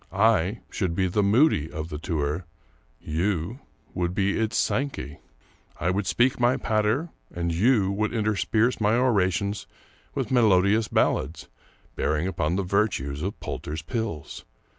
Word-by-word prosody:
I 105 0 +2
should 90 -4 -1
be 95 - +1
the 95 +3 +1
Moody 100 - +3
of 80 +1 -5
the 75 - -5
tour; 80 0 -2 0.5
you 90 - -2 0.3
would 90 0 -2
be 100 0 +1
its 110 0 0
Sankey. 135 - -1 0.6
I 90 +4 +1
would 95 0 -1
speak 120 +9 +2
my 120 +1 +3
patter, 110 +9 0 0.2
and 85 -1 -2
you 100 +1 +3
would 105 +2 -1
intersperse 110 +2 +1
my 105 +2 +3
orations 100 -5 +1 0.5
with - - -2
melodious 105 -2 +4
ballads 75 +6 0 0.5
bearing 75 +2 0
upon 85 -3 -1
the 100 - 0
virtues 90 -8 0
of 95 +4 -4
Poulter's 80 +2 -5
Pills. 110 - -4
100 Hz, 140 wpm, -25 LUFS, 85-110 Hz, 0.6 s, melodious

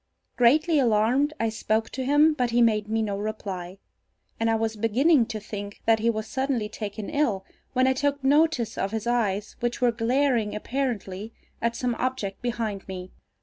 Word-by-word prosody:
Greatly 305 +6 +4
alarmed, 245 +4 +3
I 225 - +1
spoke 220 0 -1
to 260 - -3
him, 295 +4 +4
but 250 -5 0
he 235 +1 +2
made 215 -3 +3
me 220 +1 0
no 205 -2 -2
reply, 195 -4 -5 0.6
and 225 0 +1
I 225 - +3
was 225 0 -1
beginning 235 +5 +3
to 225 -2 -4
think 205 -1 -7
that 225 -1 +4
he 230 +2 +2
was 215 -1 -1
suddenly 260 -2 -1
taken 210 -1 -6
ill, 245 -11 0 0.3
when 255 0 +3
I 260 - +4
took 285 +1 -1
notice 275 -5 +2
of 195 - 0
his 220 +1 -4
eyes, 215 -4 0
which 240 0 -2
were 245 -1 +3
glaring 235 -1 +1
apparently 220 -4 -3 0.3
at 235 0 0
some 250 -1 -1
object 255 -7 -2
behind 225 -5 -3
me. 185 -1 -7
230 Hz, 180 wpm, -26 LUFS, 210-260 Hz, 0.6 s, Greatly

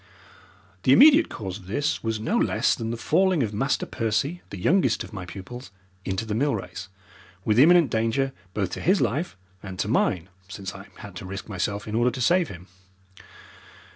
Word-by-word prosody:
The 130 - +5
immediate 300 - +7
cause 95 -2 -6
of 90 - -16
this 145 +9 -1
was 110 -1 -1
no 110 - -1
less - - +2
than 115 - -4
the 115 - -3
falling 175 +4 +2
of 105 -2 -3
Master 135 +7 0
Percy, 120 +10 -1
the - - -7
youngest 180 - +2
of - - -12
my 95 -3 -6
pupils, 120 +8 -9 0.4
into 95 +3 -2
the 110 - -3
mill 140 +4 +1
race, 95 -1 -7 0.6
with 110 +2 +3
imminent 165 -2 +6
danger 115 +5 0 0.2
both 100 -4 -1
to - - -5
his 190 +2 +3
life 145 - -1 0.2
and 95 -1 -8
to - - -1
mine, 90 +1 +1 0.2
since 100 -1 -7
I 95 0 -11
had 100 -3 -10
to 95 - -7
risk 95 0 -6
myself 100 +1 -3
in 105 - -5
order 120 +2 +3
to 130 - -6
save 170 +7 +3
him. 90 -1 -10
110 Hz, 190 wpm, -25 LUFS, 95-140 Hz, 0.6 s, immediate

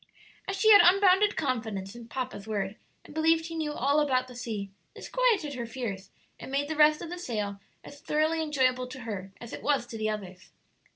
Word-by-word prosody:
As 390 - -2
she 435 +2 +5
had 410 - +10
unbounded 390 +3 +5
confidence 220 -9 -2
in 235 -1 -11
"papa's" 250 -4 -5
word, 205 -2 -2 0.3
and - - -13
believed 320 +1 +2
he 330 0 -6
knew 310 -2 -2
all 280 +3 +2
about 255 -4 +1
the 250 - -11
sea, 215 -5 -5 0.2
this - - -8
quieted 435 -12 +1
her 240 -3 -5
fears 210 -6 -5 0.3
and - - -9
made 280 +1 0
the 315 - -2
rest 305 +1 +5
of 335 - -7
the 355 - -5
sail 210 - -3 0.2
as 285 - -12
thoroughly 315 +2 +1
enjoyable 260 -5 +1
to 255 +1 -9
her 200 -5 -6
as 235 - -9
it - - -6
was 280 -4 +1
to 230 -2 -8
the 215 0 0
others. 190 -4 -6
260 Hz, 210 wpm, -28 LUFS, 220-315 Hz, 0.3 s, had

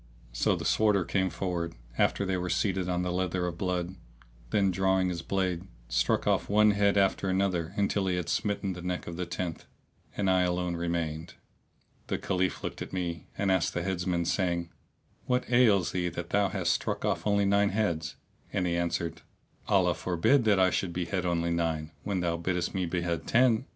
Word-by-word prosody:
So - - +2
the - - -5
Sworder 105 -4 +3
came 95 +1 +1
forward 85 -1 -3 0.2
after 100 - +2
they 95 0 0
were 90 0 -2
seated 95 -2 0
on 90 0 0
the 90 - -1
leather 90 0 -1
of 85 -1 -4
blood;[FN#634] 90 0 -2 0.5
then 100 +3 +2
drawing 95 0 +2
his 85 -2 -3
blade, 95 0 -1 0.2
struck - - +1
off - - +1
one 105 +1 +5
head 100 0 +2
after 95 0 +2
another 95 -3 0
until 100 -1 +1
he 90 - +1
had 90 -2 -3
smitten 100 -2 -1
the 90 - -8
neck 90 0 -3
of 85 - -6
the 90 0 -3
tenth; 85 -1 -4 0.5
and 100 - 0
I 95 -1 +4
alone 90 -1 0
remained. 85 -1 -3 0.7
The - - -1
Caliph 95 0 -1
looked - - -5
at - - -6
me 85 -3 -3
and 100 -1 +1
asked 95 -3 +1
the 85 - -1
Heads 90 -1 -2
man, 85 -2 +1
saying, 85 -2 0 0.6
"What 125 0 +1
ails 110 -7 +4
thee 90 -1 -1
that 85 - -6
thou 100 -1 +3
hast - - +1
struck - - -2
off - - -1
only 100 -1 +3
nine 100 +1 +3
heads?"; 85 -8 -1 0.4
and 95 -2 0
he 85 -1 0
answered, 85 -1 -2 0.5
"Allah - - +3
forbid 95 +9 +2
that 105 -3 +4
I 95 0 +4
should 90 -3 -1
behead 90 +1 -2
only 85 -1 0
nine, 80 -2 -1
when 100 -3 -2
thou 85 -1 0
biddest 90 0 -1
me 95 -2 -1
behead 85 -1 -2
ten!" 120 0 +3
90 Hz, 190 wpm, -29 LUFS, 85-100 Hz, 0.7 s, one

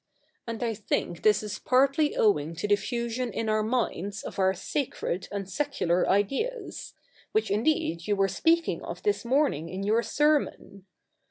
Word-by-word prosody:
And 230 +1 -4
I 230 -1 0
think 195 -5 -2
this 210 -1 +4
is 210 -1 -5
partly 275 +4 +3
owing 165 -6 +2
to 170 +6 -3
the 205 - +5
fusion 235 +3 -3
in 225 - -3
our 215 0 +2
minds 215 -4 -2
of - - -7
our 190 0 +4
sacred 215 - -3
and 200 -2 -4
secular 190 - 0
ideas 275 - -1 0.2
— - - -29
which 435 0 +1
indeed 205 - 0
you 205 - +2
were 195 0 +2
speaking 330 - +1
of - - -7
this 415 -7 +1
morning 245 - +1
in 185 +2 -4
your 220 +3 +2
sermon. 290 -9 0
215 Hz, 165 wpm, -27 LUFS, 195-275 Hz, 0.2 s, the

